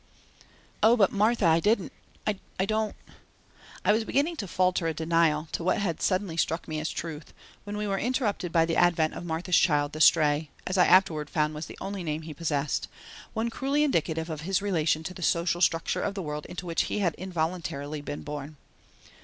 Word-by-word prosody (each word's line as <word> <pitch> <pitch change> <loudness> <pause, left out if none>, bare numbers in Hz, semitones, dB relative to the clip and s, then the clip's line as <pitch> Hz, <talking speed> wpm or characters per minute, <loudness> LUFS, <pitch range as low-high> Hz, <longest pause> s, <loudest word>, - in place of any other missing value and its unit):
"Oh, 230 +2 +6
but, 195 -4 +4
Martha, 215 +1 +2
I 165 0 +5
didn't 205 +1 +1 0.3
I 205 -2 -1 0.3
don't 215 +1 -1 0.5
" - - -21
I - - +5
was 220 +2 +2
beginning 290 +9 0
to 200 - -4
falter 180 -1 +1
a 160 - -1
denial 160 -1 +2
to - - -3
what 180 - +2
had 185 -6 -2
suddenly 185 -3 0
struck 165 +1 0
me 155 -1 -3
as 155 - -2
a - - -10
truth 160 -2 -6 0.3
when 205 0 -5
we 210 - -2
were 195 -1 -1
interrupted 220 - -1
by 165 -1 +4
the 165 - -1
advent 170 -3 +3
of - - -7
Martha's 165 +2 +2
child, 145 -3 +2
the 155 - -4
Stray, 150 -1 +4 0.2
as 185 - -2
I 180 - +5
afterwards 160 -6 +4
found 150 -1 +1
was 155 +1 -6
the - - -10
only 195 -1 -5
name 155 -1 -3
he 155 0 -7
possessed, 150 -2 -1 0.5
one 230 +1 -1
cruelly 275 +5 0
indicative 165 - 0
of 155 -1 -5
his 185 +3 0
relation 165 -6 0
to 185 - -5
the 180 - -10
social 170 +1 +1
structure 165 -2 +1
of 200 - -2
the 195 - -3
world 150 -1 -5
into 180 0 -7
which 170 -1 0
he - - -3
had 185 -6 +1
involuntarily 160 -5 -3
been 145 0 -6
born. 150 0 -7
170 Hz, 205 wpm, -27 LUFS, 155-195 Hz, 0.5 s, Oh